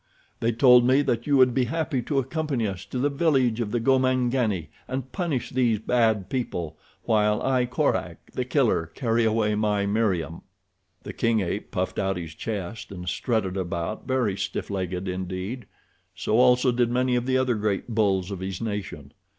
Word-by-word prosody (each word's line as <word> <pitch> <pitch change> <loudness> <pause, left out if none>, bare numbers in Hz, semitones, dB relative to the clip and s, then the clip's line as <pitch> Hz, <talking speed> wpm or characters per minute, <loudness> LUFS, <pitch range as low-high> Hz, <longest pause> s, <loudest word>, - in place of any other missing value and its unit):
They 115 - +1
told 125 +1 +6
me 130 +3 +4
that 120 -2 -1
you 145 -1 +4
would 130 -1 +5
be 125 0 +2
happy 150 0 -1
to 140 +4 -2
accompany 135 -2 -1
us 95 -2 -6
to - - -6
the 130 +3 +2
village 135 -6 +2
of 110 - -2
the 120 - 0
Gomangani 125 - +1 0.2
and 130 0 -4
punish 165 - -2
these 120 -4 +2
bad 110 -3 +1
people 90 - -3 0.3
while 105 -1 +2
I, 130 -2 +2
Korak, 125 - -2
The 125 - -2
Killer, 125 - +1
carry 115 -3 +1
away 110 -1 +2
my 105 -1 +1
Meriem." 100 -6 0 0.6
The - - -7
king 115 -2 +1
ape 85 - -3
puffed - - -2
out 95 -1 0
his 85 -3 -6
chest 100 +2 -5
and 90 -2 -8
strutted 100 -1 -1
about 95 +4 -3
very 125 -7 +1
stiff 100 - -4
legged 95 -1 -3
indeed. 95 +5 -4 0.5
So 110 - +1
also 125 0 +5
did 120 -1 +1
many 125 +1 +1
of 120 +1 -1
the 130 0 +2
other 130 -1 +2
great 105 0 -1
bulls 100 -4 +1
of 95 - -4
his 95 -1 -4
nation. 100 -10 -5
115 Hz, 175 wpm, -25 LUFS, 100-125 Hz, 0.6 s, told